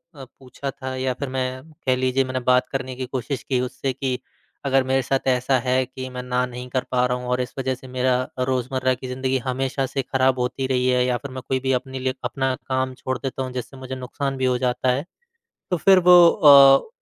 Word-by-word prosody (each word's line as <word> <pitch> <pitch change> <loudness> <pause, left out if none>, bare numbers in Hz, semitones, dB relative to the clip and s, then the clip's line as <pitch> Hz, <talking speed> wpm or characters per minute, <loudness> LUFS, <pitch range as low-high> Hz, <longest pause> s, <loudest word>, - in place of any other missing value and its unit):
अ, 135 -2 -9
पूछा 135 +1 -6
था 130 -1 -6
या 130 0 -1
फिर 140 +2 -5
मैं 130 0 -3 0.2
कह 130 -1 +3
लीजिए 130 +1 +1
मैंने 130 0 -3
बात 125 0 +3
करने 130 -1 -4
की 130 0 -4
कोशिश 130 +1 -4
की 130 -2 0
उससे 130 +1 -3
कि, 130 -1 -2 0.5
अगर 135 -1 +3
मेरे 130 +1 +1
साथ 135 +1 -1
ऐसा 130 +1 +2
है 130 +1 +2
कि 130 +1 -8
मैं 125 0 -6
ना 125 0 0
नहीं 125 0 -8
कर 130 0 -1
पा 125 -1 +2
रहा 125 0 0
हूँ 125 0 -7
और 125 - +1
इस 125 - -5
वज़ह 130 0 0
से 130 +1 -14
मेरा 130 0 +1 0.2
रोज़मर्रा 130 0 0
की 130 +1 -7
ज़िंदगी 130 +1 -1
हमेशा 135 +1 -1
से 135 +1 -2
ख़राब 130 0 +1
होती 125 +2 -2
रही 125 -1 +1
है 125 0 +3
या 125 -1 +1
फिर 130 +2 -9
मैं 130 - -6
कोई 130 - 0
भी 130 +1 -1
अपने 130 +1 -3
लिए 130 0 -1
अपना 130 +2 -1
काम 130 0 -2
छोड़ 130 0 -4
देता 135 +1 -4
हूँ 130 - -5
जिससे 130 +2 -6
मुझे 130 0 -6
नुकसान 135 +2 -4
भी 130 - 0
हो 125 -1 +2
जाता 125 0 0
है। 140 +6 -2 0.7
तो 180 - +2
फिर 190 +3 +5
वो 180 -1 +8
अ, 140 - +7
130 Hz, 230 wpm, -23 LUFS, 125-135 Hz, 0.7 s, वो